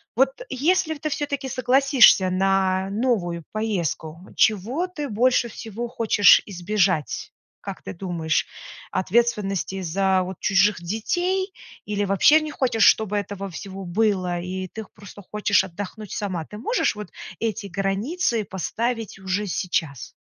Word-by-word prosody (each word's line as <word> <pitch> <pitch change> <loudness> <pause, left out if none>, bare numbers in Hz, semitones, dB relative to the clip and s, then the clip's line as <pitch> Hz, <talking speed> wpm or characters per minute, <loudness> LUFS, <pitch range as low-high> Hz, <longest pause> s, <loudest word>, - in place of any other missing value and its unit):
Вот 265 +3 +1
если 315 +5 +1
в - - -12
ты 310 - -2
всё-таки 280 -2 -3
согласишься 255 -6 +5
на 190 0 +1
новую 200 -6 -1
поездку, 175 -7 -2 0.2
чего 230 - +2
ты 300 -5 -5
больше 240 +1 +2
всего 225 +1 -6
хочешь 225 -4 +5
избежать? 185 -4 -1 0.3
Как - - -7
ты - - -6
думаешь: 170 -3 -1 0.4
ответственности 195 -2 0
за 190 +2 +1
вот 185 0 -7
чужих 195 -1 +3
детей, 355 - -1 0.3
или 205 -1 -1
вообще 200 +11 +5
не 310 -1 -5
хочешь, 245 -6 +2
чтобы 210 -1 +4
этого 200 -1 -4
всего 195 +2 -8
было 185 -2 0
и 185 +1 -4
ты 220 - -7
х - - -19
просто 205 0 -12
хочешь 210 -1 +2
отдохнуть 200 +3 -8
сама? 185 -6 -3
Ты 210 - -10
можешь 450 - 0
вот 210 0 -7 0.3
эти 220 -2 -2
границы 210 - -1
поставить 225 +4 -3
уже 190 +2 -2
сейчас? 160 - -2
205 Hz, 135 wpm, -23 LUFS, 190-240 Hz, 0.4 s, согласишься